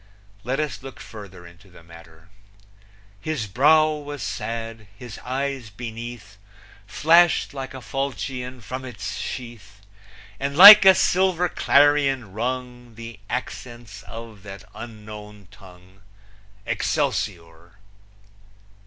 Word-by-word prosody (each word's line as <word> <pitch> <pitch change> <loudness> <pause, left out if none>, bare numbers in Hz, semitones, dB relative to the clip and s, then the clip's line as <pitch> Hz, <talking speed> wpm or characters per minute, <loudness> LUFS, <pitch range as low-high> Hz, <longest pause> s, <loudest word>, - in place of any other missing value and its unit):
Let 130 +4 -2
us 150 -6 -3
look 135 0 -11
further 95 -5 -12
into 90 +3 -17
the 90 -2 -17
matter: 85 0 -17 0.9
His 140 +1 -3
brow 150 +9 +4
was 145 -1 -7
sad; 115 -2 -6
his 120 -3 -10
eyes 135 -2 -4
beneath 115 -1 -9 0.5
Flashed 170 +4 +3
like 135 -1 -7
a 130 - -8
falchion 130 -2 -5
from 130 +5 -7
its 115 -6 -7
sheath, 110 -5 -8 0.6
And 140 +1 -3
like 205 +2 +12
a 190 -1 +8
silver 180 -1 +2
clarion 140 - +2
rung 125 +1 -5
The 115 -1 -10
accents 120 -4 -7
of 115 -3 -10
that 100 0 -11
unknown 105 -3 -11
tongue, 95 -1 -18 0.6
Excelsior! 85 0 -3
120 Hz, 110 wpm, -23 LUFS, 100-135 Hz, 0.9 s, like